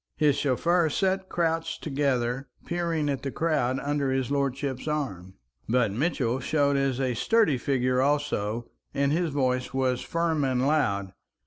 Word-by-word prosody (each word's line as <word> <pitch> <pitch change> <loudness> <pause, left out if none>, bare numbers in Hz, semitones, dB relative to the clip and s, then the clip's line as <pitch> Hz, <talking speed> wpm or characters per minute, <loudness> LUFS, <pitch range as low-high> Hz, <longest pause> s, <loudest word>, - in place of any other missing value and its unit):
His 150 -3 +3
chauffeur 160 +5 +2
sat 190 +4 0
crouched 165 -1 -1
together, 135 -3 0 0.2
peering 170 -3 -1
at 140 -2 -1
the 140 - -3
crowd 135 -4 0
under 145 -1 -1
his 130 -1 -1
lordship's 140 -1 -1
arm. 95 - -3 0.3
But 120 -3 +2
Mitchell 130 - 0
showed 140 +1 +1
as 135 -2 0
a 130 -2 0
sturdy 185 - +2
figure 130 -1 +1
also, 120 -6 -1 0.2
and 140 0 +2
his 170 +2 +1
voice 130 -2 -1
was 130 -2 +1
firm 165 -3 0
and 130 -1 +1
loud. 100 -11 +1
140 Hz, 145 wpm, -27 LUFS, 125-155 Hz, 0.3 s, His